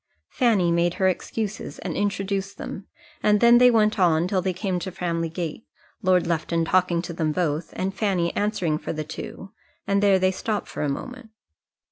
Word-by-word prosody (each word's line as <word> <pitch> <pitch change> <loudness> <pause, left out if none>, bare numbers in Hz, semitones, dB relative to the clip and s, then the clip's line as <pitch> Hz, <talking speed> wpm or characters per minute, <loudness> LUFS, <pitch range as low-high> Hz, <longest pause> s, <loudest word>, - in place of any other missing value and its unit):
Fanny 210 -9 +2
made 170 +1 +1
her 190 - +2
excuses 210 +3 -3
and - - -5
introduced 200 -1 -2
them, 195 - -7 0.3
and 210 0 +3
then 235 +1 +7
they 250 0 +7
went 215 -3 +3
on 170 -2 +3
till 185 0 0
they 190 0 0
came 185 0 -2
to 190 +1 -5
Framley 170 -2 -2
Gate, 165 +4 -5 0.4
Lord 185 -3 +3
Lufton 165 0 0
talking 175 -1 +2
to 170 - -6
them 160 -2 0
both, 160 -1 -1
and 190 +1 -2
Fanny 195 -4 0
answering 185 -7 0
for - - -4
the 155 -1 -3
two, 160 +5 -8 0.3
and 200 0 +1
there 200 -2 +5
they 185 0 +2
stopped 210 +2 -3
for - - -6
a 150 - 0
moment. 250 - -6
185 Hz, 185 wpm, -24 LUFS, 170-205 Hz, 0.4 s, then